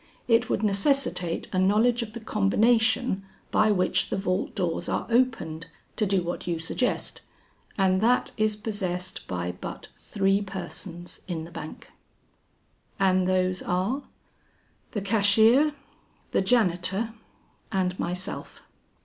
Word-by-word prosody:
It 235 0 +3
would 215 - 0
necessitate 200 - +1
a 185 - +2
knowledge 220 +6 +3
of 215 -2 -6
the 235 - -6
combination 220 +1 +2 0.3
by 215 0 +4
which 185 -3 +1
the - - -1
vault 190 -1 -1
doors 175 -4 -1
are - - -1
opened, 225 -10 +1 0.3
to 215 - +1
do 190 -2 +1
what 175 +1 -4
you 170 -1 0
suggest, 165 +10 -2 0.6
and 190 -1 +3
that 245 +3 +3
is 215 -1 +2
possessed 185 -4 -3
by 90 -1 -2
but 90 - -8
three 195 0 +1
persons 185 -2 -6
in 165 -3 -3
the 165 - -10
bank." 155 -1 -9 1.1
"And 185 -1 +3
those 185 0 +1
are?" 190 +10 -1 0.9
"The 210 - -1
cashier, 220 +8 +4 0.6
the - - +2
janitor, 195 0 +1 0.6
and 185 -1 0
myself." 180 +3 -4
195 Hz, 125 wpm, -26 LUFS, 180-220 Hz, 1.1 s, by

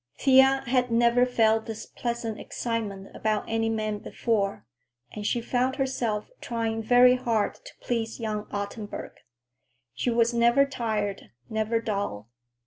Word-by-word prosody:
Thea 265 0 +5
had 250 0 +1
never 235 +1 +4
felt 225 -2 +2
this 225 0 -6
pleasant 235 -2 -4
excitement 210 -5 -4
about 215 -1 0
any 225 0 0
man 215 -2 -2
before, 200 - -1 0.5
and 210 -1 -4
she 240 - 0
found 255 +2 0
herself 250 - -2
trying 225 -1 -2
very 245 +2 +6
hard 230 -4 0
to - - -11
please 230 -1 -2
young 215 -2 -3
Ottenburg. 205 +1 -5 0.8
She - - -1
was 235 0 +2
never 235 +4 +4
tired, 220 -7 -3 0.2
never 220 +1 0
dull. 200 - -3
225 Hz, 135 wpm, -27 LUFS, 215-245 Hz, 0.8 s, very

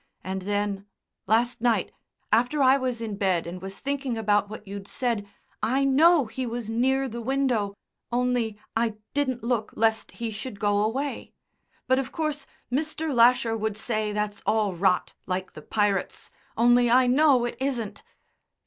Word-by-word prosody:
And 190 0 -3
then 205 0 -2 0.4
last 230 +3 +2
night, 230 -5 +1 0.4
after 250 +6 +3
I 260 +1 +6
was 255 -3 -2
in 215 -3 -4
bed 190 -5 +1
and 175 +1 -7
was 195 +1 -6
thinking 275 -3 -2
about 205 -2 +2
what 215 -1 -9
you'd 200 0 -7
said 235 -7 -2 0.3
I 265 +4 +1
know 300 +2 +5
he 250 +3 -4
was 230 -1 -4
near 265 +4 +1
the 235 -1 -6
window, 240 -5 0 0.4
only 240 -3 0 0.2
I 225 -1 +1 0.2
didn't 260 -4 -1
look 235 -2 -1
lest 225 0 +1
he 230 -1 -4
should 215 0 -7
go 205 0 +2
away. 270 +6 -3 0.5
But 260 +1 +3
of 270 - -4
course 305 -3 -3 0.2
Mr. 310 +2 -1
Lasher 235 -1 +4
would 220 -1 -2
say 215 -1 -1
that's 210 -1 -3
all 215 -3 +1
rot, 180 +1 +1
like 185 0 -3
the 155 - -10
pirates, 205 +2 -1 0.3
only 240 +1 +5
I 255 +2 +5
know 260 -1 +4
it 240 - -4
isn't." 250 -6 -3
230 Hz, 160 wpm, -26 LUFS, 205-260 Hz, 0.5 s, I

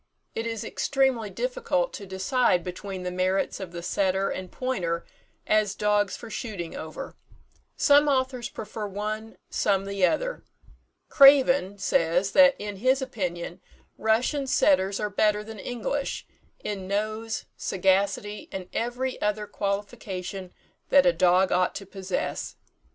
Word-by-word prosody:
It 225 +1 -3
is 225 -2 -3
extremely 265 -6 0
difficult - - -1
to 200 - -7
decide 190 0 +1
between 185 +1 -6
the 180 - -3
merits 185 +1 0
of 190 -3 -6
the 170 -1 -7
setter 190 +1 +1
and 185 -1 -6
pointer 180 -10 -2 0.4
as 215 -2 +2
dogs 210 -1 +1
for 235 - -10
shooting 210 -7 -5
over. 155 0 -7 0.6
Some 290 0 +5
authors 260 -3 0
prefer 215 0 -6
one, 215 +2 -5
some 195 -1 +1
the 200 -1 -3
other. - - -2 0.7
"Craven" 270 -7 +6
says, 180 0 +1
that 275 -1 +7
in 205 -1 -5
his 255 +6 +3
opinion 180 -7 -4 0.3
Russian 250 +6 +1
setters 200 -9 +3
are 210 -1 -2
better 210 +1 +2
than 220 -1 -9
English, 245 +6 -3 0.4
in 195 -3 -4
nose, 215 +3 -2
sagacity, 195 +2 0
and 185 -1 -6
every 250 +2 -2
other 210 0 0
qualification 195 -2 -4 0.4
that 280 - +6
a 175 - +5
dog 180 +2 +4
ought 180 0 +2
to 195 - -6
possess. 190 -1 -4
205 Hz, 135 wpm, -26 LUFS, 190-245 Hz, 0.7 s, that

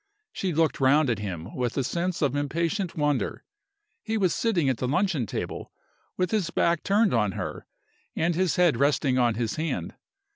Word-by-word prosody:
She 190 - -2
looked 160 0 +1
round 140 +1 +4
at 110 - -1
him 95 -2 -5
with 125 -2 -2
a 135 - +2
sense 175 +5 -2
of 140 -1 +1
impatient 165 +6 -1
wonder. 145 -3 0 0.6
He 225 0 -2
was 190 -4 +2
sitting 190 -11 +1
at 130 -3 +1
the 125 - -2
luncheon 150 - 0
table, - - -5 0.5
with 180 -1 0
his 205 -6 0
back 170 -1 +1
turned 205 0 +2
on 105 -4 +1
her, - - -5 0.5
and 170 +2 +1
his 180 0 +1
head 175 -8 +3
resting 140 -1 +2
on 120 -2 +2
his 115 +2 -2
hand. 160 +1 -3
155 Hz, 180 wpm, -26 LUFS, 125-180 Hz, 0.6 s, round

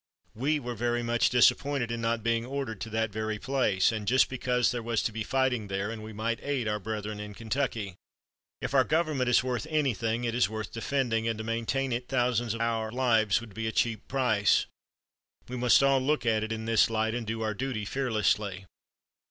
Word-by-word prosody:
We 145 +7 0
were 120 -3 -5
very 120 +1 -1
much 120 0 +2
disappointed 125 0 +3
in 115 0 -3
not 115 -1 0
being 115 0 +1
ordered 130 -6 -4
to 115 - -4
that 110 0 -1
very 110 +1 -2
place, 110 -7 +1
and 110 -2 -4
just 130 +2 +4
because 125 -2 +1
there 120 -1 -3
was 115 -1 -1
to - - 0
be 110 +1 -5
fighting 125 -2 0
there, 100 +2 -2
and 115 -1 -6
we 110 - -8
might 110 +2 -2
aid 140 -5 -1
our 105 0 -1
brethren 105 0 -4
in 105 -1 -7
Kentucky. 110 -3 -2 0.7
If - - -3
our 135 -2 +5
Government 155 -4 +1
is 125 0 +4
worth 130 +3 -2
anything 120 -6 0
it 115 -1 -1
is 120 -4 +2
worth 110 -1 -5
defending 115 -2 0
and 115 -1 -1
to 110 - -5
maintain 115 +4 -1
it 120 +1 -2
thousands 120 -3 +1
of 115 - -5
our 115 -1 -1
lives 115 -5 +2
would 115 -4 -11
be 110 +2 -3
a - - -1
cheap 110 -1 0
price. 120 -6 +2 0.8
We 125 - -6
must 125 +2 +4
all 135 -1 +4
look 150 0 0
at 110 -2 +2
it 110 - -4
in 110 0 -3
this 115 0 +4
light, 110 0 0
and 120 -2 -4
do 115 0 -2
our 110 -1 -1
duty 120 -2 -3
fearlessly." 105 -6 0
115 Hz, 210 wpm, -28 LUFS, 110-125 Hz, 0.8 s, our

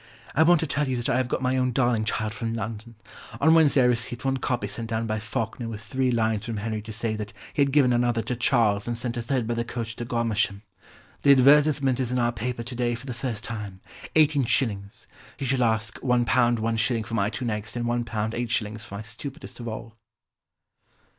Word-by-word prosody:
I 155 - +3
want 170 +1 +6
to - - +1
tell 150 -2 0
you 130 -1 -1
that 120 +2 -1
I 130 - +2
have 130 -1 +1
got 130 - -2
my 130 +1 +1
own 130 -1 +1
darling 120 -3 +2
child 110 0 -1
from 115 +1 -3
London. 115 0 -6 0.4
On 160 +3 +5
Wednesday 150 -5 +5
I - - +4
received 120 +1 0
one 135 0 +1
copy 125 -1 -1
sent 115 -1 -5
down 115 0 -1
by 110 -1 -1
Falkner 110 +2 -4
with 110 -2 -6
three 130 +3 0
lines 110 -2 0
from 115 -2 -3
Henry 110 +1 -3
to 110 +1 -9
say 110 0 -2
that 105 +1 -6 0.2
he - - +1
had 140 -1 +3
given 130 -3 +4
another 120 -1 +1
to 125 - -2
Charles 115 -4 +2
and 120 -1 -2
sent 120 +1 -4
a 120 - -2
third 125 0 -1
by 120 - -1
the 115 0 -1
coach 115 -1 -5
to 120 - -4
Godmersham.... 110 -4 0 0.6
The 140 - +7
advertisement 140 -1 +5
is 125 -2 -1
in 125 - 0
our 120 -1 +2
paper 120 +1 -4
to 120 +2 -7
day 120 -1 0
for 120 +3 -10
the 130 - -4
first 120 -3 -4
time: 105 -5 -6 0.4
18s. 130 -9 +2 0.3
He 135 - -4
shall 130 0 +1
ask 110 -2 0
£1, 125 -2 +2
1s. 115 -2 +2
for 115 - -8
my 100 -3 +1
two 125 - -4
next 105 -2 -3
and 120 -1 -2
£1, 120 0 0
8s. 110 -1 -2
for 115 -3 -9
my 100 - -5
stupidest 135 +8 -9
of 120 - -6
all." 115 0 -7
120 Hz, 220 wpm, -26 LUFS, 110-125 Hz, 0.6 s, The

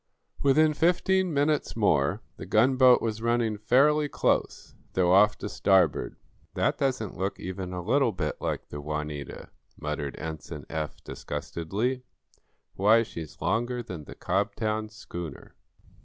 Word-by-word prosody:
Within 155 +3 +4
fifteen 180 +3 +2
minutes 145 0 +1
more 75 -10 +2
the - - -8
gunboat 130 +2 +5
was 110 -1 -2
running 115 -2 0
fairly 145 +7 +3
close, - - -1 0.2
though 90 -1 +2
off 105 +2 +5
to - - -5
starboard. 95 -4 +2 0.4
"That - - +1
doesn't 125 -9 -1
look 95 +1 -2
even 95 0 -5
a 90 -1 -5
little 125 +4 +2
bit 80 -6 -3
like - - -3
the 75 - -6
'Juanita,'" 75 -1 -5 0.3
muttered 75 -2 -4
Ensign 80 -2 -7
Eph, 80 -1 -4
disgustedly. 105 +10 -3 0.7
"Why, 110 +4 +4
she's 80 -8 -9
longer 120 +2 0
than 85 -9 -8
the - - -10
Cobtown 110 +3 -1
schooner. 85 -7 -8
105 Hz, 130 wpm, -27 LUFS, 85-125 Hz, 0.7 s, gunboat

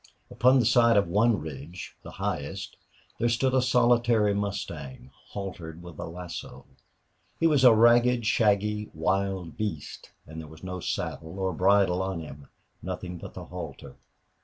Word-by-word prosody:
Upon 130 +2 +4
the 125 - +3
side 115 -1 +5
of 100 - +3
one 105 +6 +3
ridge, 75 +3 -8
the - - -10
highest, 95 +7 -4 0.4
there 120 - +2
stood 130 +3 +1
a 130 - +4
solitary 120 -3 +3
mustang, 85 -11 -5 0.2
haltered 85 -4 -7
with 85 -4 -11
a - - -4
lasso. 90 +1 -8 0.7
He 165 - +1
was 150 -5 +4
a 125 - +9
ragged, 120 +1 +5
shaggy, 105 -1 +1
wild 95 -3 -1
beast, 100 -10 -5 0.2
and 80 +1 -8
there 80 - -10
was 80 +2 -14
no 90 0 -5
saddle 80 0 -4
or 95 -1 -1
bridle 95 +1 +3
on 95 -2 -2
him, 70 -3 -10 0.3
nothing 90 -1 -6
but - - -10
the - - -7
halter. 85 -6 -8
95 Hz, 155 wpm, -27 LUFS, 85-115 Hz, 0.7 s, a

